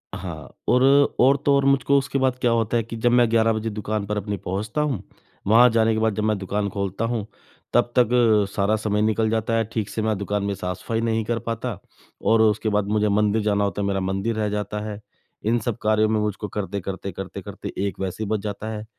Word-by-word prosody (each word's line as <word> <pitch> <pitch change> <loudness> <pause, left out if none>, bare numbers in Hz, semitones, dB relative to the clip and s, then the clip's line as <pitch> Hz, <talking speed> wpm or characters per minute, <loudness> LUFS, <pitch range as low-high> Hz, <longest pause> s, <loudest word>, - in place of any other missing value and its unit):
हाँ, 85 -7 -8
और 125 +1 +4 0.4
और 135 +3 +5
तो 140 - +5
और, 140 0 +2
मुझको 140 0 +3
उसके 140 0 -1
बाद 130 -1 +1
क्या 120 - +3
होता 115 0 +1
है 115 - +1
कि 115 +1 -8
जब 120 +2 +2
मैं 120 -1 +4
11 115 -1 +3
बजे 110 +1 -2
दुकान 105 -1 -3
पर 105 +1 -3
अपनी 100 0 -3
पहुँचता 105 +11 -3
हूँ, 135 -10 -1 0.4
वहाँ 120 +4 +7
जाने 115 -1 +2
के 110 - 0
बाद 110 -2 +1
जब 105 - -1
मैं 110 -1 +1
दुकान 100 +1 -2
खोलता 100 +2 -3
हूँ, 115 -3 -2 0.5
तब 120 - +3
तक 120 -2 +5 0.5
सारा 100 +2 +2
समय 105 -1 -1
निकल 110 0 +1
जाता 115 0 -1
है। 115 - +2
ठीक 110 -3 -2
से 110 - -3
मैं 110 -2 0
दुकान 100 0 -2
में 100 0 -1
साफ़-सफ़ाई 95 +5 -3
नहीं 115 -1 0
कर 115 +1 -1
पाता, 115 -2 -4 0.4
और 110 0 +3
उसके 110 0 +2
बाद 105 -1 0
मुझे 105 0 +1
मंदिर 105 +1 +2
जाना 105 -1 +1
होता 100 0 -1
है, 100 - 0
मेरा 95 -1 0
मंदिर 95 +4 -1
रह 105 -1 0
जाता 105 0 -3
है। 105 0 -6 0.5
इन 115 +2 +2
सब 115 -1 -3
कार्यों 110 0 +2
में 110 - +1
मुझको 105 0 -2
करते-करते, 100 -1 -4
करते-करते 95 +1 -7
1 95 - -6
वैसे 95 +3 -3
ही 105 - -4
बज 110 -2 0
जाता 105 +1 -5
है। 110 0 -5
110 Hz, 230 wpm, -23 LUFS, 100-115 Hz, 0.5 s, वहाँ